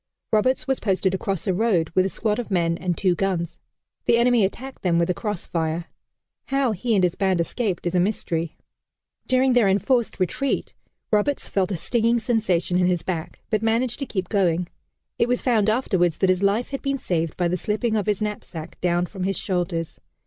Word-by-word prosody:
Roberts 255 +5 +2
was 265 -1 +1
posted 190 -2 +1
across 195 -2 -2
a 190 - +1
road 185 -5 +1
with 185 +2 +3
a - - -4
squad 215 +3 -1
of 245 - -4
men 170 -3 +1
and 175 0 -2
two 185 -3 +2
guns. 175 -2 -2 0.5
The 235 - +4
enemy 240 -2 +4
attacked 260 +7 -4
them 175 -3 +2
with 170 +1 +2
a - - +1
cross 205 0 -4
fire. 165 0 -2 0.6
How 270 -3 +1
he 220 +3 0
and 190 - +3
his 175 -2 +3
band 190 -2 +1
escaped 185 +1 -1
is 175 - -1
a 180 - +3
mystery. 170 -4 -1 0.7
During 260 0 +3
their 240 -4 +4
enforced 230 +5 +1
retreat, 220 +9 -1 0.4
Roberts 215 +7 +1
felt 195 0 0
a 185 - -1
stinging 235 +6 +1
sensation 190 -7 +1
in 180 - +3
his 180 -2 0
back, 170 -3 -4
but 215 -1 +2
managed 230 +3 0
to 275 - -3
keep 190 -3 -3
going. 180 -4 +1 0.5
It 235 - +3
was 250 0 0
found 220 -5 +3
afterwards 185 - +1
that 190 -1 +3
his 185 0 0
life 205 +6 +1
had 275 - -3
been 275 0 -1
saved 165 - -2
by 175 - +2
the 175 - 0
slipping 215 +5 -1
of 210 -1 0
his 210 0 +1
knapsack 180 -6 -6
down 175 0 +2
from 190 +1 -9
his 195 0 -1
shoulders. 175 -3 -2
195 Hz, 200 wpm, -24 LUFS, 175-230 Hz, 0.7 s, The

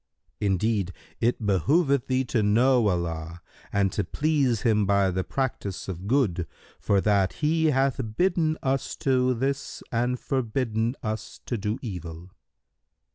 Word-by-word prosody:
Indeed, 100 -1 0 0.3
it 115 -1 0
behoveth 135 - +2
thee 130 0 +1
to 120 -2 0
know 115 +3 +4
Allah 85 -2 -2 0.3
and 100 -1 +2
to 105 - -1
please 140 -7 +1
Him 105 -4 +3
by 100 -1 +3
the 95 +1 -1
practice 120 -8 -3
of 95 0 -6
good, 105 -10 +1 0.3
for 100 - +2
that 100 -2 +2
He 160 +1 +1
hath 135 -2 +2 0.2
bidden 170 -4 +2
us 135 0 -1
to 130 -4 +2
this 135 +3 -3
and 125 +2 0
forbidden 120 -2 -1
us 110 -1 -4
to 120 - -2
do 105 +1 -2
evil." 90 -4 -7
115 Hz, 135 wpm, -26 LUFS, 100-135 Hz, 0.3 s, know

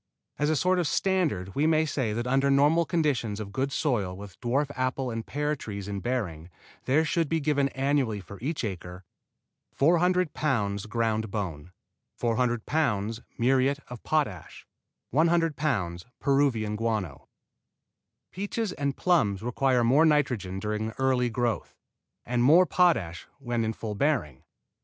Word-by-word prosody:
As 150 +1 +2
a 155 - +2
sort 180 +5 +2
of 170 - +1
standard 150 - 0
we 150 +3 +2
may 160 0 +3
say 130 -7 -1
that 120 +3 -2
under 135 +2 +2
normal 145 +5 +4
conditions 140 -9 0
of 100 -2 -6
good 135 +4 -1
soil 105 - -1
with 100 -1 -11
dwarf 135 +4 0
apple 130 0 -1
and 115 0 -4
pear 150 +4 -1
trees 100 -7 -7
in 100 -1 -3
bearing 95 -10 -3 0.4
there 150 +5 +3
should 165 -1 0
be 165 - +1
given 140 -2 +1
annually 135 -5 0
for 100 +1 -11
each 150 +4 -2
acre: 90 -3 -6 0.7
400 175 +3 +2
pounds 105 -8 -1
ground 110 -1 -1
bone 90 -6 -5 0.4
400 120 -1 0
pounds 115 -8 0 0.2
muriate 135 +3 +2
of 125 -2 -8
potash 145 - -2 0.5
100 165 +2 +2
pounds 95 - -2
Peruvian 135 -7 +1
guano 105 -9 -3 1.0
Peaches 205 +2 -3
and 140 -3 -2
plums 110 - +2
require 125 +1 +1
more 135 +7 +5
nitrogen 125 - +1
during 105 +1 -2
early 130 -2 +2
growth, 120 -1 -2 0.5
and 120 +1 0
more 165 +8 +7
potash 115 - +1
when 120 -4 -2
in 110 - 0
full 110 -1 -5
bearing. 105 - 0
125 Hz, 145 wpm, -27 LUFS, 105-150 Hz, 1.0 s, more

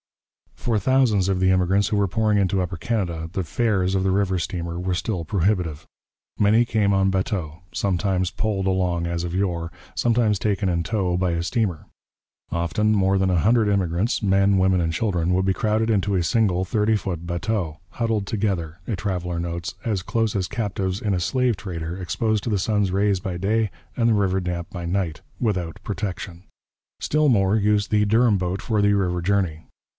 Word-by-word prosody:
For 115 -3 -1
thousands 110 -3 +2
of 95 -1 +1
the 95 0 +3
immigrants 95 +2 +2
who 105 - 0
were 100 -1 +2
pouring 105 +2 +1
into 95 -1 +1
Upper 90 -1 -3
Canada 85 -6 -2
the 95 - -1
fares 95 +1 0
of 95 - +1
the 95 - +2
river 95 -1 +1
steamer 85 -1 -4
were 90 0 -1
still 90 -2 -2
prohibitive. 90 -4 0 0.5
Many 110 +3 +4
came 105 -3 +1
on 95 0 +3
bateaux, 95 -4 -2
sometimes 95 -1 0
poled 100 -1 -2
along 90 -3 0
as 85 0 -2
of 85 -1 -4
yore, 85 -3 -1 0.2
sometimes 115 -3 +2
taken 100 -2 0
in 85 -1 0
tow 95 -4 0
by 90 -1 +1
a 85 0 -1
steamer. 95 - -1 0.6
Often 85 +6 +1
more 95 -1 +3
than 95 -1 +2
a 90 - +2
hundred 110 +4 +3
immigrants, 95 +2 0
men, 100 -1 +3
women, 95 -1 +3
and 80 -1 -1
children, 90 -5 0
would 95 +1 +1
be 95 - +2
crowded 110 +3 0
into 100 -2 +1
a 90 - +1
single 95 -3 +2
thirty 110 +2 +1
foot 90 -5 -3
bateau, 85 -2 -2
'huddled 115 -4 -1
together,' 95 -6 -2
a 115 - -1
traveller 90 -3 -3
notes, 85 0 -4
'as 105 -6 -1
close 115 -1 0
as 95 -2 0
captives 100 -4 -2
in 105 -2 0
a 90 - 0
slave 125 +5 +1
trader, 85 -3 -5
exposed 105 +5 -1
to 115 - -2
the 100 - +1
sun's 105 -1 +1
rays 100 0 +2
by 90 -1 -4
day, 105 +4 +1 0.3
and 115 -1 +3
the - - +4
river 95 -2 +1
damp 90 -2 -4
by 85 -2 -6
night, 85 -3 -2 0.2
without 95 -9 -1
protection.' 95 -3 -5 0.6
Still 150 0 +2
more 100 -4 +3
used 105 -1 +2
the 105 -1 +3
Durham 110 0 +3
boat 90 +1 -2
for 110 -3 +1
the 100 0 +4
river 90 -3 0
journey. 90 -4 0
95 Hz, 190 wpm, -23 LUFS, 90-105 Hz, 0.6 s, Many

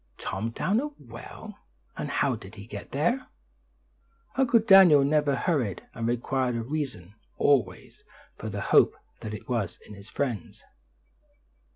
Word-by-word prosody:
"Tom 110 +4 -3
down 195 - 0
a 290 - -2
well! 120 -4 -11 0.4
And - - -4
how - - +1
did 95 +3 -12
he 100 -1 -10
get 100 -4 -8
there?" 205 - 0 1.1
Uncle 250 -3 +4
Daniel 195 -9 +7
never 145 0 +2
hurried, 135 - -1
and 115 0 -3
required 125 +1 0
a 115 - -2
reason, 125 - -4 0.2
always, 120 -11 0 0.3
for - - -6
the - - -4
hope - - +4 0.2
that 105 +3 -7
was 115 -8 -2
in - - -12
his 100 +1 -13
friends. 120 -10 -4
125 Hz, 140 wpm, -27 LUFS, 110-150 Hz, 1.1 s, Daniel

